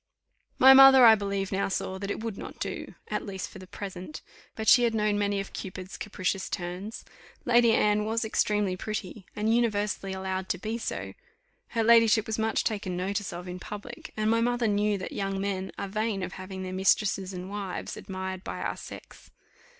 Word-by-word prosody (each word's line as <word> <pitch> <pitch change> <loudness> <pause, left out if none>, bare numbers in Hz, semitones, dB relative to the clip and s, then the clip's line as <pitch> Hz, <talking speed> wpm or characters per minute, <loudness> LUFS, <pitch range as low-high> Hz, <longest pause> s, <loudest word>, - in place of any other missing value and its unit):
My 265 +1 +9
mother, 265 -1 +9
I 225 - +10
believe, 200 -2 -2
now 195 0 0
saw 190 0 -3
that 200 0 -4
it 215 - -3
would 225 -3 -3
not - - -9
do, - - -5
at 210 - -2
least 190 -3 -5
for - - -11
the 185 - -11
present; 190 +7 -7 0.3
but 220 0 -5
she 245 - +8
had 235 -2 +2
known 210 -1 +1
many 205 -1 0
of 195 - -6
Cupid's 185 0 -7
capricious 195 -1 -3
turns. 180 +5 -5 0.4
Lady 240 -1 +5
Anne 210 0 +3
was 225 +1 -1
extremely 210 -3 +1
pretty, 200 -1 -6
and 215 +2 +1
universally 210 -4 0
allowed 190 0 -3
to - - 0
be 220 +5 -4
so; - - -4 0.5
her 230 -1 -1
ladyship 230 -1 +5
was 220 0 -3
much 220 0 +1
taken 200 -4 -2
notice 200 +2 -2
of 175 +1 -7
in 180 0 -6
public, 210 +6 -8
and 215 0 +1
my 230 0 +3
mother 240 0 +1
knew 205 0 +1
that 185 - -6
young 195 -1 -2
men 195 -1 -2
are 200 - -3
vain 210 -1 -2
of 180 - -4
having 190 0 -7
their 185 0 -5
mistresses 190 0 +1
and 180 0 -6
wives 200 -3 -5
admired 190 -1 -6
by - - -5
our - - -3
sex. - - -11
205 Hz, 195 wpm, -28 LUFS, 190-220 Hz, 0.5 s, I